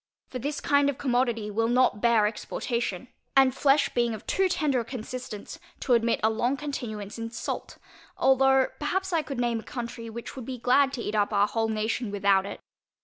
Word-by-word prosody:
For 255 Hz, -, -5 dB
this 290 Hz, +4 st, -3 dB
kind 285 Hz, 0 st, +3 dB
of 280 Hz, -, -3 dB
commodity 240 Hz, -5 st, 0 dB
will 225 Hz, +2 st, +1 dB
not 245 Hz, -3 st, +2 dB
bear 230 Hz, -3 st, +4 dB
exportation, 230 Hz, 0 st, -3 dB, 0.3 s
and 265 Hz, -1 st, +6 dB
flesh 280 Hz, +1 st, +3 dB
being 235 Hz, -2 st, 0 dB
of 215 Hz, -, -11 dB
too 380 Hz, -1 st, +1 dB
tender 300 Hz, -7 st, +1 dB
a -, -, -2 dB
consistence, 245 Hz, -2 st, -7 dB, 0.2 s
to 255 Hz, -, +2 dB
admit 235 Hz, 0 st, +2 dB
a 220 Hz, -, +5 dB
long 245 Hz, +5 st, 0 dB
continuance 230 Hz, -8 st, -5 dB
in 230 Hz, 0 st, -4 dB
salt, 230 Hz, -, -5 dB, 0.4 s
although 265 Hz, 0 st, +4 dB
perhaps 380 Hz, +5 st, -1 dB
I 330 Hz, -, +3 dB
could 275 Hz, -3 st, -6 dB
name 240 Hz, -2 st, 0 dB
a -, -, -10 dB
country, 235 Hz, -3 st, -6 dB
which 235 Hz, +4 st, -8 dB
would 255 Hz, -4 st, -7 dB
be 255 Hz, 0 st, -5 dB
glad 265 Hz, +3 st, +3 dB
to 240 Hz, -, -4 dB
eat 210 Hz, -, -3 dB
up 210 Hz, 0 st, +1 dB
our 205 Hz, -1 st, +4 dB
whole 225 Hz, +2 st, 0 dB
nation 220 Hz, +1 st, -1 dB
without 200 Hz, -1 st, +2 dB
it. -, -, -7 dB
240 Hz, 200 wpm, -27 LUFS, 220-270 Hz, 0.4 s, and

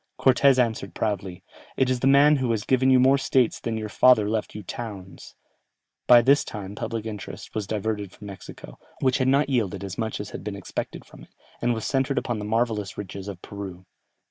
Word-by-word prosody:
Cortès 135 Hz, +1 st, +5 dB
answered 110 Hz, -7 st, 0 dB
proudly, 95 Hz, -4 st, -3 dB, 0.3 s
"It 130 Hz, -, +3 dB
is 130 Hz, -1 st, 0 dB
the 135 Hz, -, +1 dB
man 145 Hz, +2 st, +6 dB
who 130 Hz, -2 st, -1 dB
has 110 Hz, -3 st, 0 dB
given 130 Hz, 0 st, +2 dB
you 130 Hz, -1 st, +6 dB
more 135 Hz, +2 st, +5 dB
States 130 Hz, -3 st, +1 dB
than 115 Hz, -1 st, -3 dB
your 110 Hz, -1 st, -4 dB
father 110 Hz, 0 st, +4 dB
left 110 Hz, -1 st, -2 dB
you 105 Hz, -, -6 dB
Towns." 100 Hz, -3 st, -8 dB, 0.7 s
By 120 Hz, -1 st, +8 dB
this 140 Hz, +3 st, +4 dB
time 100 Hz, -2 st, -7 dB
public 115 Hz, +1 st, -4 dB
interest 105 Hz, -2 st, -7 dB
was 105 Hz, -3 st, -3 dB
diverted 105 Hz, -2 st, -3 dB
from 105 Hz, -, -13 dB
Mexico, 95 Hz, -10 st, -10 dB, 0.2 s
which 130 Hz, +1 st, +2 dB
had 130 Hz, -, +1 dB
not 140 Hz, +3 st, +3 dB
yielded 105 Hz, -8 st, -1 dB
as 95 Hz, +1 st, -6 dB
much 110 Hz, -1 st, -2 dB
as 105 Hz, -, -6 dB
had -, -, -7 dB
been 105 Hz, 0 st, -5 dB
expected 100 Hz, -, -6 dB
from -, -, -15 dB
it, -, -, -17 dB, 0.3 s
and 120 Hz, 0 st, +1 dB
was 110 Hz, -, -5 dB
centred 135 Hz, 0 st, 0 dB
upon 120 Hz, -4 st, -1 dB
the 105 Hz, -, -5 dB
marvellous 110 Hz, -2 st, -1 dB
riches 100 Hz, -1 st, -7 dB
of 95 Hz, -3 st, -8 dB
Peru. 95 Hz, -3 st, -8 dB
110 Hz, 205 wpm, -25 LUFS, 100-130 Hz, 0.7 s, By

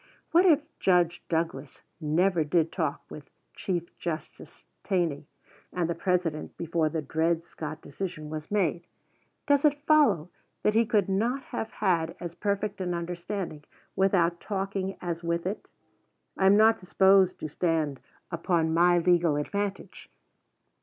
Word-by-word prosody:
What 355 Hz, +3 st, +5 dB
if 310 Hz, -4 st, +5 dB, 0.2 s
Judge 175 Hz, -2 st, +2 dB
Douglas 160 Hz, -4 st, -3 dB, 0.2 s
never 170 Hz, +2 st, +2 dB
did 160 Hz, +1 st, +1 dB
talk -, -, -2 dB
with -, -, -10 dB, 0.3 s
Chief 175 Hz, -3 st, -3 dB
Justice 165 Hz, -2 st, -6 dB, 0.2 s
Taney 170 Hz, -7 st, -1 dB, 0.4 s
and 175 Hz, -2 st, -1 dB
the 170 Hz, -, -1 dB
President 170 Hz, -3 st, -1 dB
before 165 Hz, -1 st, 0 dB
the 160 Hz, -1 st, -3 dB
Dred 165 Hz, +3 st, 0 dB
Scott 155 Hz, -1 st, -7 dB
decision 155 Hz, +1 st, -6 dB
was 155 Hz, -1 st, -6 dB
made: 175 Hz, -4 st, 0 dB, 0.6 s
does 285 Hz, -1 st, +3 dB
it 290 Hz, -1 st, +2 dB
follow 285 Hz, -, +4 dB, 0.3 s
that 210 Hz, -, +3 dB
he 225 Hz, 0 st, +3 dB
could 210 Hz, -5 st, +2 dB
not 230 Hz, +8 st, 0 dB
have 220 Hz, -, -5 dB
had 170 Hz, -5 st, 0 dB
as 170 Hz, -1 st, -6 dB
perfect 200 Hz, +1 st, -2 dB
an 180 Hz, -1 st, -1 dB
understanding 170 Hz, -1 st, -5 dB, 0.3 s
without 175 Hz, -3 st, +2 dB
talking 195 Hz, -1 st, -3 dB
as 170 Hz, -1 st, -3 dB
with 170 Hz, 0 st, -1 dB
it? 195 Hz, +3 st, -4 dB, 0.7 s
I 190 Hz, -, +3 dB
am 200 Hz, +1 st, +6 dB
not 220 Hz, +1 st, +5 dB
disposed 190 Hz, 0 st, +4 dB
to -, -, -3 dB
stand 155 Hz, -3 st, -1 dB, 0.3 s
upon 170 Hz, -1 st, 0 dB
my 175 Hz, +1 st, +4 dB
legal 170 Hz, -2 st, +3 dB
advantage. 200 Hz, +6 st, -4 dB
175 Hz, 140 wpm, -28 LUFS, 165-195 Hz, 0.7 s, am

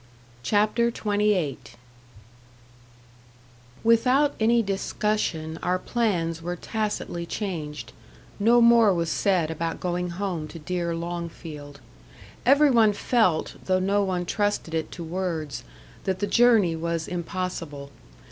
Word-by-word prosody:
CHAPTER 215 Hz, -, +2 dB
XXVIII 205 Hz, -, 0 dB, 2.2 s
Without 250 Hz, +6 st, +4 dB
any 230 Hz, +1 st, +3 dB
discussion, 195 Hz, -5 st, -2 dB
our 180 Hz, 0 st, +1 dB
plans 175 Hz, -8 st, -1 dB
were 175 Hz, +1 st, -3 dB
tacitly 210 Hz, -4 st, -3 dB
changed 160 Hz, -9 st, -5 dB, 0.5 s
no 235 Hz, +4 st, +5 dB
more 230 Hz, -4 st, +6 dB
was 170 Hz, -1 st, -1 dB
said 180 Hz, -5 st, +1 dB
about 165 Hz, +1 st, -3 dB
going 180 Hz, 0 st, -2 dB
home 175 Hz, -3 st, -3 dB
to 165 Hz, -, -10 dB
dear 170 Hz, +1 st, -2 dB
Longfield. 165 Hz, -4 st, -7 dB, 0.7 s
Every 285 Hz, +1 st, +6 dB
one 225 Hz, -4 st, +5 dB
felt, 205 Hz, -6 st, +1 dB
though 185 Hz, 0 st, +2 dB
no 195 Hz, +2 st, +1 dB
one 180 Hz, -2 st, -1 dB
trusted 205 Hz, -3 st, -1 dB
it 160 Hz, -1 st, -2 dB
to 175 Hz, -, -7 dB
words, 165 Hz, -3 st, -3 dB, 0.4 s
that 190 Hz, -1 st, 0 dB
the 205 Hz, -, -1 dB
journey 220 Hz, -7 st, +4 dB
was 165 Hz, 0 st, -2 dB
impossible. 170 Hz, -5 st, -5 dB
180 Hz, 115 wpm, -25 LUFS, 165-210 Hz, 2.2 s, more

